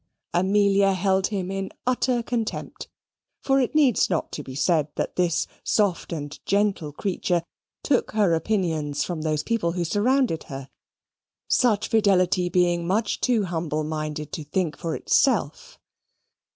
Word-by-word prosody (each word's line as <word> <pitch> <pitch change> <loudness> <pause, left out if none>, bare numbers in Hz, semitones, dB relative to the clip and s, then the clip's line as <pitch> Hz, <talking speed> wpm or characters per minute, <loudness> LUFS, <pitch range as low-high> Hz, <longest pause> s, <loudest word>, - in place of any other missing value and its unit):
Amelia 195 +2 +3
held 190 0 +1
him 190 -3 -3
in 195 0 -3 0.2
utter 250 -1 +1
contempt; 230 -2 -4 0.6
for 270 0 +3
it 260 +3 -1
needs 280 -7 +4
not 170 -4 -1
to - - -5
be 130 -2 -9
said 155 0 +2
that - - -3
this 175 -2 +1 0.2
soft 200 -5 0
and 150 -2 -6
gentle 200 -6 0
creature 175 +1 -1 0.4
took 270 -4 +1
her 205 -5 +3
opinions 160 -5 0
from 170 -3 -4
those 155 -1 -1
people 205 -6 0
who 175 -1 -1
surrounded 225 - +1
her, 135 -1 -8 0.8
such 220 -4 +2
fidelity 185 -4 +2
being 175 -1 +1
much 205 +3 0
too 240 -4 +2
humble 160 -4 -2
minded 155 -1 -4
to 155 - -5
think 155 +1 -2
for 165 +1 -3
itself. 220 - +1
185 Hz, 140 wpm, -24 LUFS, 160-210 Hz, 0.8 s, needs